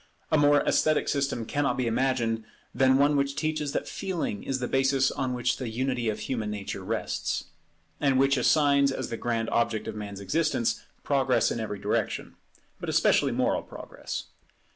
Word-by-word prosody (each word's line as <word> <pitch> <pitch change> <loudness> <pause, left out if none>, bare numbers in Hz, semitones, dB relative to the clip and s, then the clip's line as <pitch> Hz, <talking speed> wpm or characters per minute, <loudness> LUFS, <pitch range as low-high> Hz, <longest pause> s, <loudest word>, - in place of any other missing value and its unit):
A - - +4
more 145 0 +5
esthetic 155 -1 +2
system 140 -5 -1
cannot 140 0 0
be 130 - 0
imagined 115 -2 0 0.3
than 130 +1 +4
one 145 +1 +4
which 140 0 0
teaches 155 -2 -1
that - - -2
Feeling 165 - -3
is 135 - -2
the 125 -1 -3
basis 135 0 +2
on 130 -2 -2
which 125 +1 0
the 125 -3 -4
unity 125 0 -1
of 105 - -3
human 110 -5 -2
nature 100 -2 -5
rests; 110 +3 -2 0.6
and 135 -2 +2
which 135 +1 +4
assigns 140 +1 +4
as - - -4
the - - -1
grand 115 -1 -1
object 115 -2 0
of 110 - -3
man's 105 -2 -6
existence, 150 +2 0 0.2
progress 135 -3 +2
in - - -2
every 105 -2 -3
direction, - - -2 0.5
but - - -5
especially - - +3
moral - - +1
progress. - - -7
130 Hz, 170 wpm, -27 LUFS, 115-140 Hz, 0.6 s, more